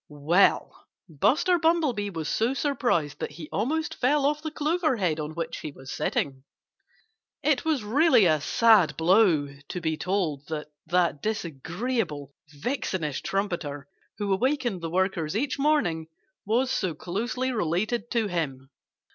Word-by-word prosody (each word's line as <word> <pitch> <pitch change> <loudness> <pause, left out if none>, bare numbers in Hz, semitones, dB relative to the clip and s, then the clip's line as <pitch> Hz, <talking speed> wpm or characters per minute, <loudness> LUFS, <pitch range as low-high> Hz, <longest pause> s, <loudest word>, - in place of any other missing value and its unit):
Well, 155 +6 +2 0.2
Buster 310 - +2
Bumblebee 310 -11 +1
was 165 -5 -4
so 235 - +1
surprised 240 - 0
that - - -4
he 155 0 -8
almost 310 +10 -1
fell 280 +3 +2
off 295 +1 +1
the 315 - -3
clover 310 -2 0
head 170 -6 0
on 155 +1 -5
which 165 -1 -4
he 155 - -6
was 130 -1 -11
sitting. 135 -2 -2 1.0
It 300 -2 +2
was 305 -8 +1
really 250 - +4
a 155 -3 +3
sad 200 -7 +4
blow 170 -4 +4 0.2
to 180 - -4
be 160 -2 -1
told 170 -7 -1
that 150 -1 -5 0.2
that 170 -4 +1
disagreeable, 170 - -3 0.2
vixenish 155 - -3
trumpeter, 170 -8 -3 0.3
who 205 -2 0
awakened 240 -3 0
the 165 - -3
workers 180 -1 0
each 275 +3 -1
morning, 195 - +1 0.4
was 250 +4 +2
so 185 -10 -1
closely 235 - -2
related 215 +3 -1
to 230 -2 +1
him. 140 -8 -3
190 Hz, 140 wpm, -26 LUFS, 155-255 Hz, 1.0 s, really